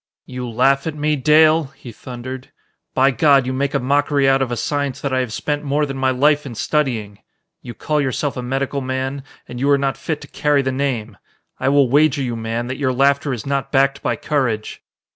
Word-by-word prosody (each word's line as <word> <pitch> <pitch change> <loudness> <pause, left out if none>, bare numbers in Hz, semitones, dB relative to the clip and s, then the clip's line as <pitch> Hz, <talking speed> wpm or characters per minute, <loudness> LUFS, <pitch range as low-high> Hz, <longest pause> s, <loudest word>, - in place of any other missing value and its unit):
"You 125 -1 -6
laugh 135 +5 +2
at 160 - -3
me, 150 0 0
Dale," 155 +3 +4
he 120 - -10
thundered. 130 +2 -8 0.5
"By 135 +1 +4
God, 140 +1 +4
you 130 - -2
make 140 +2 -1
a - - +2
mockery 140 +1 +1
out 135 0 +3
of 130 -2 -1
a 120 - -2
science 140 -1 -2
that 140 -2 -2
I 130 - +2
have 125 -3 -2
spent 145 +6 -2
more 145 +1 0
than 135 -1 -5
my 130 0 +1
life 145 +3 +2
in 125 -4 -8
studying! 115 -7 -1 0.4
You 120 - -9
call 150 -1 -1
yourself 135 +1 -2
a 125 - -4
medical 135 +2 -2
man 130 +1 -3 0.2
and 125 - -7
you 140 +2 +1
are 140 - +5
not 135 -1 -1
fit 155 -2 -3
to - - -10
carry 145 -2 +1
the 130 - -1
name! 125 -6 -2 0.4
I - - +1
will 140 -1 +4
wager 145 +1 +3
you, 120 -2 -3
man, 115 +1 -3
that 130 +1 -5
your 130 -3 +1
laughter 140 +2 +2
is 120 -5 -4
not 140 -1 -2
backed 135 0 +2
by - - 0
courage!" 130 -8 -2
135 Hz, 220 wpm, -19 LUFS, 125-145 Hz, 0.5 s, are